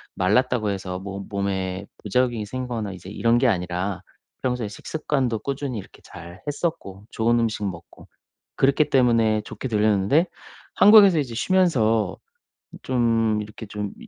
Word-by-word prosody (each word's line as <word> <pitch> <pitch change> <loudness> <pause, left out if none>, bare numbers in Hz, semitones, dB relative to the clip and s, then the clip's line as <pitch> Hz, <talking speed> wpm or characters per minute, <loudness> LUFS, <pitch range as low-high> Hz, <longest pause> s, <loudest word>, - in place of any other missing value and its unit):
말랐다고 110 +3 +1
해서 95 -2 -4
뭐 100 0 -6
몸에 100 -1 -2 0.2
부작용이 120 +1 0
생기거나 120 -4 -4
이제 90 0 -10
이런 115 +2 +2
게 130 - +3
아니라 90 -2 -1 0.4
평소에 125 -4 -1
식습관도 130 -1 -2
꾸준히 140 -2 -4
이렇게 - - -13
잘 85 +1 -12
했었고 145 - -4
좋은 120 +1 +2
음식 115 -2 -1
먹고 85 -4 -8 0.5
그렇기 140 +3 +2
때문에 115 -4 +3
좋게 130 - -7
들렸는데 105 - +2 0.5
한국에서 200 -5 +8
이제 125 -5 -5
쉬면서 115 - +2 0.7
좀 115 -4 +1
이렇게 105 +1 -10
좀 105 -1 -5
이 - - -12
110 Hz, 320 characters per minute, -23 LUFS, 100-130 Hz, 0.7 s, 한국에서